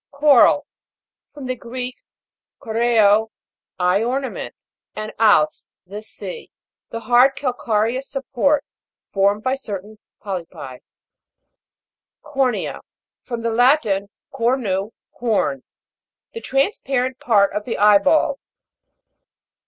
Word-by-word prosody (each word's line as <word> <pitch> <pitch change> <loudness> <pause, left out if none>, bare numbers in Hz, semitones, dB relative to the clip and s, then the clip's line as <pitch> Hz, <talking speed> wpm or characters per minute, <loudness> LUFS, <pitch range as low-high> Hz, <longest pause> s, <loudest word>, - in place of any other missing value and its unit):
CO'RAL. 280 -3 +4 0.7
From 285 -3 -9
the 255 0 -2
Greek, 250 +2 -6 0.6
koreo, 220 -2 +3 0.5
I 180 +3 +2
ornament, 260 +3 -3 0.4
and 215 0 -5
als, 205 -9 +3
the 205 +3 -8
sea. 465 - -9 0.4
The 230 - -6
hard 245 +4 +4
calca'reous 245 -1 -1
support, 275 +2 0 0.5
formed 200 +2 +2
by 260 - +1
certain 215 -5 -7 0.2
polypi. 165 -9 -7 1.4
COR'NEA. 270 -4 -1 0.4
From 235 -3 -6
the 230 - 0
Latin, 225 -5 +2 0.2
cornu, 230 -6 0 0.2
horn. 215 - -1 0.7
The 460 - -7
transparent 265 - -1
part 205 -4 +3
of 210 0 -3
the 240 - -3
eye 205 0 +6
ball. 315 - +2
230 Hz, 100 wpm, -20 LUFS, 205-265 Hz, 1.4 s, eye